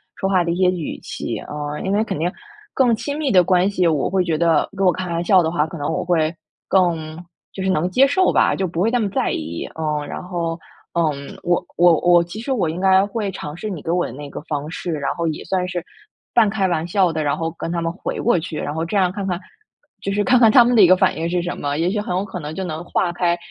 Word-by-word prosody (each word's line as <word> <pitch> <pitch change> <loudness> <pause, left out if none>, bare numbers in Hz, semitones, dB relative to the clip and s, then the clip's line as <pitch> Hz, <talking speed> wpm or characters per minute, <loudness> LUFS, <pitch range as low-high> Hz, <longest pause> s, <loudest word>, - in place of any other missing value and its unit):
说 195 - -2
话 185 -3 +3
的 170 - -1
一 170 - -1
些 180 0 +3
语 175 -4 -4
气。 - - -5
呃， 150 0 -5
因 195 +1 -1
为 210 - +2
肯 220 - -4
定 175 +2 0 0.4
更 245 -4 +4
亲 285 +6 -4
密 290 -5 0
的 180 -2 +6
关 180 +1 +3
系， 180 -3 +1
我 155 -4 +1
会 185 -1 +1
觉 165 -3 -1
得 165 -2 +2
跟 195 - +1
我 180 - +6
开 185 0 -4
玩 170 0 -1
笑 190 0 +5
的 160 - 0
话， 155 -3 +1
可 160 +2 -8
能 145 - -2
我 165 - -2
会 160 -2 +2 0.4
更 165 -4 +1 0.3
就 190 - -5
是 190 - +1
能 175 +1 +1
接 255 +9 +5
受 365 +7 +2
吧， - - +3
就 190 -1 -1
不 165 0 -5
会 225 - +2
那 245 - +2
么 205 -3 0
在 - - 0
意， 80 +2 -4
嗯。 150 -2 -2
然 - - -6
后， 170 -2 -3 0.3
嗯， 150 -4 -2
我 175 0 +1
我 170 -2 +5
我 175 -1 +5
其 175 +5 -8
实 240 +4 -4
我 195 -11 +1
应 165 - -4
该 190 +1 +4
会 205 -1 -3
尝 150 -3 -7
试 215 +4 -5
你 175 -6 -5
给 165 - -3
我 175 0 +1
的 - - -6
那 145 +3 -8
个 - - -7
方 150 -1 -4
式， 175 - -5
然 145 -3 -2
后 170 -1 -1
也 155 - -3
算 180 +1 -1
是 180 -1 -4 0.5
半 220 -3 +5
开 195 -2 0
玩 170 -1 -1
笑 185 -2 +2
的， 155 -1 -1
然 145 - 0
后 165 0 -2
跟 165 - -4
他 170 -1 -1
们 165 - -1
回 180 - -5
过 225 -7 +2
去， 160 -1 -6
然 145 - -3
后 160 +1 -2
这 205 - -4
样 180 -2 +3
看 195 0 -4
看 180 -2 -1 0.6
就 195 - -2
是 205 +1 +1
看 250 +1 +4
看 225 -3 +6
他 245 +1 +8
们 245 +1 +2
的 220 - +7
一 180 - +8
个 185 - +7
反 190 -1 +2
应 165 +1 -2
是 175 0 0
什 175 +1 -4
么。 145 0 -2
也 165 +3 +1
许 210 - -1
很 195 -3 -3
有 190 - 0
可 190 -2 -6
能 150 -1 -6
就 190 - -3
能 160 -2 -5
化 175 0 0
开， 175 0 +1
175 Hz, 300 characters per minute, -20 LUFS, 160-195 Hz, 0.6 s, 他